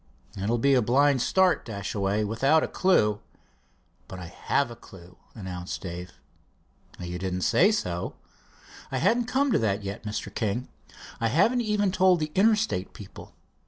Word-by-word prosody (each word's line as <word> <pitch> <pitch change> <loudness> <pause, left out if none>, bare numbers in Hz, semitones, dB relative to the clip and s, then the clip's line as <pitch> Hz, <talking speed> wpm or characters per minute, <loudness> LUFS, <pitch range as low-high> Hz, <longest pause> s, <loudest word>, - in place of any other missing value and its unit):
"It 100 +2 -3
will 120 - +2
be 140 +4 +3
a 130 - +4
blind 135 +3 +3
start, 190 +6 +2
Dashaway, 100 -1 -2
without 135 +9 +2
a - - -1
clew." 105 - +2 0.9
"But 95 - -8
I 90 - -7
have 120 +9 -1
a - - -8
clew," 90 -4 -15 0.2
announced 90 -4 -6
Dave. 90 0 -7 0.9
"You 90 0 -5
didn't 90 0 -3
say 195 - +4
so." 90 - -3 0.8
"I 135 - -1
hadn't 235 - +2
come 270 +3 +1
to - - +3
that 105 -2 -1
yet, 100 +1 -5
Mr. 105 0 -5
King. 110 +3 -2 0.5
I 115 - +1
haven't 200 - +3
even 210 -3 +1
told 185 -1 +4
the 155 -1 -3
Interstate 210 - +1
people. 100 - -12
115 Hz, 160 wpm, -26 LUFS, -, 0.9 s, a